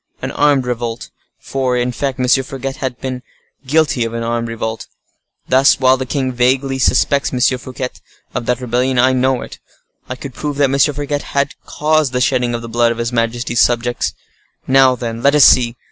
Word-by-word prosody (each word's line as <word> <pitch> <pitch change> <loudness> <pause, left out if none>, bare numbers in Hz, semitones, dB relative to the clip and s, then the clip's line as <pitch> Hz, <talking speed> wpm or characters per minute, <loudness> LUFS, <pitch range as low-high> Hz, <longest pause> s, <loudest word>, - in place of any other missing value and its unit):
An - - -4
armed 145 -3 +2
revolt!—for, 125 +2 -4
in 125 0 0
fact, 135 +1 -3
M. 125 - 0 0.2
Fouquet 135 0 -5
has 130 -1 -4
been 130 +1 -6 0.5
guilty 150 -4 +2
of 115 0 -4
an 115 - -3
armed 115 0 -2
revolt. 110 -1 -5 0.6
Thus, 130 +2 +4
while 130 0 +4
the 130 0 -5
king 130 -1 -1
vaguely 130 +2 +1
suspects 140 +2 +2
M. 125 - -2 0.2
Fouquet 130 -1 -5 0.4
of 120 - -4
rebellion, 125 +2 0
I 130 +1 +4
know 130 0 +1
it—I 125 - -12
could 130 0 -9
prove 145 +1 -4
that 140 -2 +2
M. 140 - 0
Fouquet 145 +1 +1
had 140 0 -2
caused 155 -3 +1
the 125 - 0
shedding 125 -1 +1
of 115 - -5
the - - -6
blood 120 0 +2
of 115 - -4
his 120 +1 -3
majesty's 120 +1 0
subjects. 120 0 0 0.5
Now, 130 -1 +4
then, 115 -2 -5
let 140 +3 +3
us 150 - +7
see. 120 -1 +4
130 Hz, 180 wpm, -17 LUFS, 120-135 Hz, 0.6 s, us